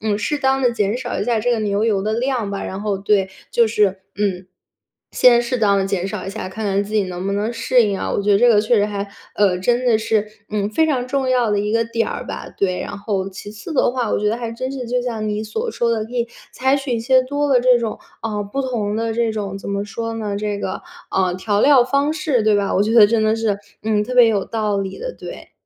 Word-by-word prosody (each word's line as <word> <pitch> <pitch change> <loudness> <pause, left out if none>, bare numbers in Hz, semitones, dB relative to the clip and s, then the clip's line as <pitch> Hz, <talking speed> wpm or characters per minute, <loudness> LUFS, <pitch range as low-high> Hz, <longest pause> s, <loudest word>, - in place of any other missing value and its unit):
嗯， 210 -1 0
适 295 +7 -1
当 270 -1 +2
地 250 -2 +2
减 215 0 0
少 255 - -3
一 - - -1
下 235 -2 +1
这 245 +3 +1
个 230 - 0
牛 205 0 0
油 205 -4 +1
的 215 +2 -1
量 240 -3 -1
吧， 200 - -4
然 190 +1 -5
后， 205 -2 -1
对， 195 -1 +1 0.2
就 235 -2 +4
是， 200 -3 +1 0.2
嗯， 190 -3 -1 0.7
先 240 -1 +5
适 250 +1 -2
当 200 -3 +3
地 195 - 0
减 195 -1 -1
少 195 -1 -5
一 195 - -3
下， 215 -2 -5
看 215 +4 -6
看 200 0 +1
自 210 +2 -7
己 215 - +3
能 180 0 -5
不 200 - -1
能 210 +3 -1
适 240 +2 +3
应 200 -2 -1
啊， - - -3
我 - - -1
觉 205 +1 +3
得 200 - +5
这 245 +3 +5
个 225 -3 +5
确 235 +2 +2
实 205 -1 +3
还， 205 -1 -4 0.3
呃， 195 -3 +2
真 240 +7 +1
的 235 -3 +4
是， 215 -1 0 0.2
嗯， 210 -1 -1
非 320 +9 +2
常 255 -5 0
重 265 0 -1
要 250 -3 +2
的 205 - +1
一 210 +1 -2
个 230 0 +2
点 230 0 -1
儿 - - -5
吧， - - -6
对。 185 -2 0
然 - - -5
后 200 -2 -2
其 195 +2 -9
次 215 +9 -8
的 255 - +3
话， 245 -4 -1
我 - - +1
觉 210 - -1
得 225 - 0
还 235 -2 -4
真 255 +3 -4
是 255 -3 -5
就 245 +1 0
像 225 -3 -3
你 210 +1 -2
所 445 - -3
说 235 - 0
的， 220 -2 -1
可 240 - -14
以 235 -1 0 0.3
采 265 +1 +2
取 275 -2 -3
一 230 - -1
些 260 +3 +4
多 285 +3 -1
的 260 -3 +4
这 250 0 +5
种， 230 -2 -3 0.2
啊， 215 -2 -2
不 205 +7 -3
同 215 -5 -2
的 225 0 -1
这 230 -1 +1
种 200 -2 -4
怎 195 - -8
么 200 0 -2
说 230 +2 -5
呢， 210 -3 -3
这 205 -1 -2
个， 190 - -4 0.3
呃， 185 -2 +1
调 205 +2 0
料 270 -2 +6
方 280 +3 +1
式， 305 -7 0
对 215 -1 +3
吧？ 200 -1 0
我 195 - +3
觉 215 +2 0
得 220 -3 +9
真 225 0 +1
的 215 +1 +2
是， 215 -3 0 0.2
嗯， 215 -1 +1
特 250 +4 -4
别 245 -2 +7
有 205 -4 +1
道 215 -3 -1
理 195 -1 -4
的， - - -5
对。 - - -10
220 Hz, 290 characters per minute, -20 LUFS, 205-245 Hz, 0.7 s, 得